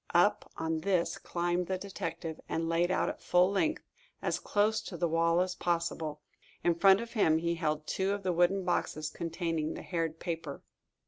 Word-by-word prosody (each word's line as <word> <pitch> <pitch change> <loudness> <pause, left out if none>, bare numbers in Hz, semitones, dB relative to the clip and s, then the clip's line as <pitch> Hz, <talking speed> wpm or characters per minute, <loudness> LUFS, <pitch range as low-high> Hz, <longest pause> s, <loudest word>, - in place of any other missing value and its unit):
Up - - +3
on 160 0 -1
this 180 0 0
climbed 175 0 -1
the 190 - -1
detective, 170 -4 -5
and 165 0 -1
laid 170 +1 +2
out 185 - +1
at - - -4
full 180 +2 +4
length, 310 +10 0 0.4
as - - -1
close 215 +1 +1
to 195 -5 -7
the 170 - +1
wall 165 +1 +3
as 185 0 0
possible. 165 -4 -2 0.4
In 175 - +4
front 190 +4 +5
of 235 0 -7
him 165 -9 +4
he 170 +1 0
held 155 -2 -1
two 190 +4 0
of 200 0 -2
the 185 -1 +1
wooden 175 +2 +2
boxes 155 -3 -1
containing 165 -2 -2
the - - -7
haired 165 -2 -2
paper. 165 -5 -5
170 Hz, 185 wpm, -31 LUFS, 165-190 Hz, 0.4 s, front